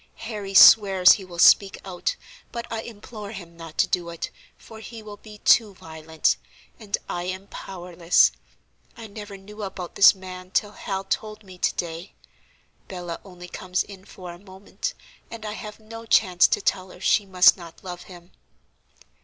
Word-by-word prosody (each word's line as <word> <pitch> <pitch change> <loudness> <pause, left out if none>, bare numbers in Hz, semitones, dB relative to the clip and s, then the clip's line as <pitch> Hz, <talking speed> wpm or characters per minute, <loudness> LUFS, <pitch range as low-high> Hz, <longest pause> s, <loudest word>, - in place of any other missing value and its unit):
Harry 210 -4 -6
swears 195 -3 +8
he 200 - +2
will 180 -2 -11
speak 195 +3 +5
out, 190 - -2 0.4
but 235 0 -5
I 225 - -2
implore 215 -1 -9
him 170 -4 -10
not 165 -2 -11
to - - +3
do 175 -1 -1
it, 170 -1 -6 0.3
for 220 -1 -13
he 225 0 -10
will 210 -1 -10
be 210 0 -13
too 210 -1 +4
violent; 160 -1 -1 0.4
and 210 -3 -2
I 175 0 -4
am 185 +1 -5
powerless. 175 -3 +1 0.7
I 230 - -8
never 210 -1 -9
knew 210 +2 -12
about 190 -3 -6
this 200 - +7
man 185 -1 -10
till 205 +2 0
Hal 195 -2 -4
told 215 +2 -4
me 185 -2 -14
to - - +1
day. 170 +2 -5 0.7
Bella 175 -3 -6
only 180 -2 -12
comes 180 +1 -2
in 195 -2 -13
for 180 -3 -10
a 175 - -14
moment, 195 - -7 0.3
and 225 -2 -8
I 210 - -3
have 210 -1 -8
no 225 +1 -11
chance 185 -5 +5
to - - 0
tell 185 -1 -1
her 180 - -13
she 200 +2 +2
must 185 -1 +6
not 170 -2 -13
love 180 -1 -7
him." 175 -1 -14
190 Hz, 175 wpm, -24 LUFS, 180-210 Hz, 0.7 s, swears